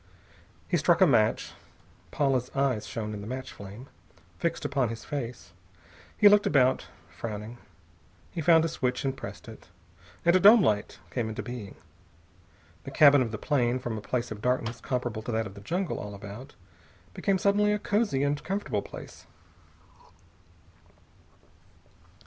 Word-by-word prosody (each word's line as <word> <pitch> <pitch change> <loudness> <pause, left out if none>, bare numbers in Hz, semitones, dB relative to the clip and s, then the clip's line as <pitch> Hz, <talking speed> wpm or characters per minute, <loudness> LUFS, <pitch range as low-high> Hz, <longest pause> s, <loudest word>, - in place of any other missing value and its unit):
He - - +1
struck - - +3
a - - +7
match. - - +2 0.6
Paula's 130 -3 0
eyes 135 -6 0
shone 105 -2 -4
in 105 - -6
the 100 - -8
match 130 +2 -5
flame, 100 +5 -10 0.5
fixed - - -2
upon 135 -4 0
his 115 0 -7
face. 120 -10 -6 0.6
He 210 - +7
looked 205 0 +6
about, 130 -2 +3 0.2
frowning. 110 +1 -7 0.7
He 170 - -4
found 165 0 +5
a - - +1
switch 130 -5 -2
and 135 0 -1
pressed - - -9
it, - - -12 0.6
and 170 +1 +5
a - - +6
dome 210 +2 +8
light 105 -6 0
came 120 -3 -2
into 110 -1 -5
being. 120 -3 -7 1.1
The - - -7
cabin 145 -1 +6
of 120 - 0
the 110 - -5
plane, 125 -1 +1
from 120 -3 -4
a 110 - -5
place 120 +3 -3
of 105 -1 -6
darkness 120 -1 -1
comparable 125 -4 -3
to 115 - -5
that 110 0 0
of 100 - -8
the 100 - -12
jungle 175 - -2
all 105 -1 -7
about, 105 +6 -10 0.6
became 195 -1 0
suddenly 205 +2 +2
a 210 - +2
cosy 205 -9 0
and 145 +1 -1
comfortable 180 - -2
place. - - -11
125 Hz, 155 wpm, -28 LUFS, 110-150 Hz, 1.1 s, dome